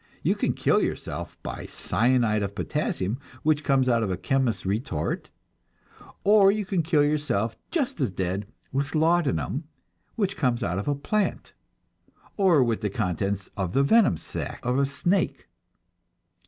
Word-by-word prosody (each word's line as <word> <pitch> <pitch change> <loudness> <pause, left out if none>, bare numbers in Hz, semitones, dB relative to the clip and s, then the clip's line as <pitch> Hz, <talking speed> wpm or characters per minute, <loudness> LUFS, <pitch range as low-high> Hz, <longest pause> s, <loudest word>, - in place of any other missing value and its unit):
You - - +3
can - - 0
kill - - +2
yourself - - -4
by - - -6
cyanide 115 +1 +1
of 100 0 -3
potassium, 115 -3 -2 0.2
which 155 -1 +2
comes 135 -2 +2
out 120 -2 +3
of 110 - -1
a 90 - -1
chemist's 120 +4 0
retort; 95 - -2 1.0
but 205 -1 +6
you 210 -1 -2
can 185 -2 0
kill 155 -2 +3
yourself 145 -8 0
just 290 - -1
as 130 - +2
dead 95 +2 -3 0.2
with 140 +3 -2
laudanum, 160 -2 +1 0.5
which 200 -3 -1
comes 125 -4 +1
out 90 +2 -1
of 100 - -5
a 145 - +2
plant, 200 +8 -1 0.8
or 180 -9 +4
with 115 -2 0
the 105 - 0
contents 100 +2 -2
of 95 -2 -2
the 135 - +4
venom 210 - +4
sac - - -6
of 125 +2 +1
a 140 - +2
snake. 175 +8 -1
130 Hz, 155 wpm, -26 LUFS, 100-155 Hz, 1.0 s, but